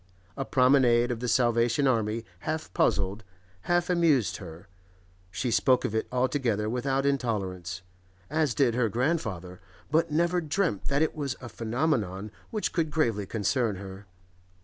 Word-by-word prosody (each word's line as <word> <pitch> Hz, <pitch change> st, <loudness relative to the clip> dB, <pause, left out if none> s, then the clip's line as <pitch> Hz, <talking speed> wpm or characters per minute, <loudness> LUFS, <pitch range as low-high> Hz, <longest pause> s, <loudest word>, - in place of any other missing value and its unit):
A 135 Hz, -, -3 dB
promenade 125 Hz, -3 st, +4 dB
of 120 Hz, -, -3 dB
the 125 Hz, -, -3 dB
Salvation 120 Hz, +2 st, +2 dB
Army 115 Hz, -3 st, +1 dB
half 155 Hz, +8 st, -4 dB
puzzled, 100 Hz, +2 st, +1 dB, 0.5 s
half 175 Hz, 0 st, +2 dB
amused 165 Hz, -, +2 dB
her; 85 Hz, -3 st, -11 dB, 0.6 s
she 120 Hz, +6 st, -2 dB
spoke 120 Hz, +4 st, +3 dB
of -, -, -2 dB
it 110 Hz, -, -1 dB
altogether 125 Hz, -4 st, 0 dB
without 135 Hz, +4 st, 0 dB
intolerance, 95 Hz, -10 st, -2 dB, 0.4 s
as 150 Hz, -5 st, 0 dB
did 125 Hz, -2 st, +3 dB
her 120 Hz, -2 st, +1 dB
grandfather, 110 Hz, -, -2 dB, 0.3 s
but 165 Hz, +2 st, +2 dB
never 170 Hz, +3 st, +1 dB
dreamt 160 Hz, -, -1 dB
that 140 Hz, +2 st, +2 dB
it 160 Hz, -, -1 dB
was 140 Hz, -4 st, -3 dB
a 120 Hz, -, -8 dB
phenomenon 110 Hz, -, -1 dB, 0.2 s
which 215 Hz, -2 st, -2 dB
could 160 Hz, -2 st, 0 dB
gravely 115 Hz, -10 st, 0 dB
concern 110 Hz, +1 st, 0 dB
her. 95 Hz, +1 st, -9 dB
120 Hz, 145 wpm, -28 LUFS, 105-145 Hz, 0.6 s, promenade